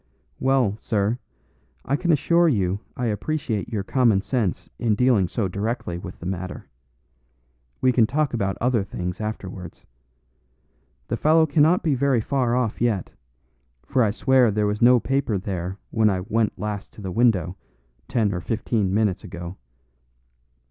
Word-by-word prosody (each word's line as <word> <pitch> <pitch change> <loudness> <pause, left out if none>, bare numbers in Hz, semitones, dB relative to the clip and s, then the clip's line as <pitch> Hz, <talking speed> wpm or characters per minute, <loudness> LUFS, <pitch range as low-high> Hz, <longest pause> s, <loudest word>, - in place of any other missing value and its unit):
Well, 130 -6 +2
sir, 105 +3 0 0.7
I 135 - +1
can 175 +3 +1
assure 170 +3 +3
you 100 -6 0 0.2
I 125 - -1
appreciate 110 0 -2
your 105 -4 -2
common 110 -4 +2
sense 110 -9 -1
in 110 -3 +1
dealing 120 -5 +3
so 105 +2 -1
directly 100 -2 -3
with 90 0 -9
the - - -9
matter. 90 0 -5 1.1
We 130 - +4
can 115 -3 +4
talk 145 +2 0
about 100 -4 -1
other 120 -3 +1
things 90 -1 -5
afterwards. 95 -5 -6 1.2
The - - -2
fellow 160 +4 +4
cannot 155 +3 +3
be 155 - +2
very 135 -1 +2
far 125 0 0
off 125 -4 -1
yet, 115 -6 0 0.7
for 130 -2 +1
I 110 - +4
swear 130 +3 +3
there 105 0 0
was 105 0 -1
no 125 +1 +7
paper 130 -4 0
there 95 -1 -4
when 110 -1 +3
I 95 -2 -1
went 110 +2 0
last 105 -1 -5
to - - -12
the 95 -2 -4
window, 95 -6 +2 0.5
ten 110 -5 +1
or 90 - -3
fifteen 110 -1 -1
minutes 105 -2 +1
ago. 85 0 -7
110 Hz, 155 wpm, -23 LUFS, 95-125 Hz, 1.2 s, no